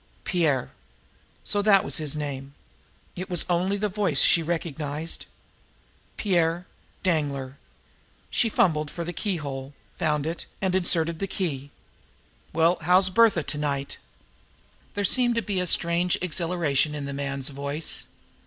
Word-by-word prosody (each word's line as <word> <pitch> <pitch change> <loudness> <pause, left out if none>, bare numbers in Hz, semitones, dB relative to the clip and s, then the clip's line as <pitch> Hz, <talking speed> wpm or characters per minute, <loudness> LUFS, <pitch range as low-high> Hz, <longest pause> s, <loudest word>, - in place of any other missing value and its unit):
Pierre! 155 -8 +1 0.7
So 205 - 0
that 200 -2 +5
was - - +1
his 155 -2 -2
name! 140 -2 -5 0.6
It 185 +3 -5
was 175 -2 0
only 180 +3 +1
the 210 +1 0
voice 195 -7 +1
she 170 - +5
recognized. 160 -1 -3 0.9
Pierre 175 -3 +1 0.4
Danglar! 140 -6 -1 0.7
She 230 - +2
fumbled 160 -10 +2
for 170 - -5
the 175 +1 -5
keyhole, 145 -8 -4 0.2
found 150 -2 +1
it, 165 +2 -4
and 190 -2 0
inserted 170 -3 +1
the 195 - -1
key. 145 -8 -3 0.8
"Well, 165 +2 +3
how's 185 +3 +4
Bertha 215 -6 +4
to 150 - -4
night?" 140 -2 -2 1.0
There 205 - 0
seemed 240 +3 +4
to 230 - +1
be 195 -1 -1
a 180 - 0
strange 170 +2 +3
exhilaration 165 -4 0
in 145 -1 -4
the 140 - -4
man's 140 -1 -2
voice. 140 +3 -3
165 Hz, 135 wpm, -26 LUFS, 145-185 Hz, 1.0 s, that